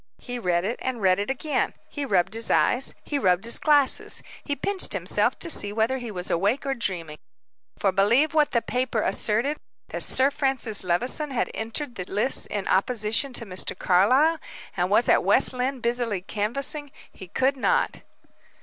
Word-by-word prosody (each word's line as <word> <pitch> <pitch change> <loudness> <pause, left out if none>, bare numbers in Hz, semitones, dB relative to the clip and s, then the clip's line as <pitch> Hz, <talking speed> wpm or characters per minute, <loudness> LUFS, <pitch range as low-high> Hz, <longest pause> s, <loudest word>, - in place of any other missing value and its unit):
He 245 -1 -6
read 180 -4 0
it, 230 +4 -3
and 260 -2 -3
read 190 -2 +2
it 205 - -3
again; 275 +3 -1
he 290 -1 -5
rubbed 195 -6 +1
his 225 0 -2
eyes, 260 +2 +2
he 290 - -2
rubbed 180 -5 +2
his 235 +1 +4
glasses, 290 -3 +3 0.2
he 285 - -3
pinched 380 +7 -1
himself, - - 0
to - - -3
see 205 -11 0
whether 225 +5 0
he 240 -2 -7
was 180 -3 -5
awake 205 +11 0
or 275 - 0
dreaming. 180 -10 -4 0.6
For 195 - +1
believe 235 +11 +2
what 305 -2 +3
that 235 - -1
paper 250 -3 -1
asserted 240 +8 +1 0.3
that - - 0
Sir 265 +2 +3
Francis 265 -8 +1
Levison 245 - 0
had 260 - -2
entered 240 +5 -5
the 180 -5 -6
lists 210 +7 +1
in 205 -2 -4
opposition 225 +5 +1
to 230 - -2
Mr. 185 -2 -1
Carlyle, 255 - +3 0.4
and - - 0
was - - +3
at - - +4
West - - +4
Lynne, 255 +1 -2
busily 235 -5 -1
canvassing 275 - -1 0.2
he 190 - -12
could 265 +9 0
not. 260 - 0
235 Hz, 175 wpm, -24 LUFS, 200-275 Hz, 0.6 s, his